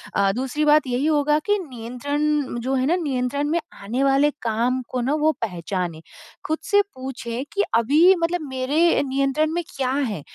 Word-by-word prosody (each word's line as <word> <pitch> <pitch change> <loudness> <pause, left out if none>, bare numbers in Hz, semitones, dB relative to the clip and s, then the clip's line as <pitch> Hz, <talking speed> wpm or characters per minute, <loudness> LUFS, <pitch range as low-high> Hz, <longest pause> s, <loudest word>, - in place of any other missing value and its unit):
अ, 195 -1 +3
दूसरी 265 +4 -2
बात 300 -2 +4
यही 250 +3 0
होगा 295 -1 +3
की 415 - +3
नियंत्रण 280 +3 -2
जो 265 +2 -1
है 260 0 +1
ना 340 - +3
नियंत्रण 280 -3 -1
में 340 +2 +1 0.2
आने 240 +7 -1
वाले 275 +2 +4
काम 235 +3 0
को 250 - -2
ना 260 +4 0
वो 315 - +4
पहचाने। 180 -4 -3 0.5
खुद 315 - 0
से 405 0 +4
पूछें 255 -2 -5
कि 405 - +2
अभी 300 +11 +5
मतलब 340 +1 0
मेरे 285 +6 +2
नियंत्रण 275 +3 +1
में 345 +1 -1
क्या 260 -2 -1
है? 245 - -1
270 Hz, 175 wpm, -23 LUFS, 245-300 Hz, 0.5 s, अभी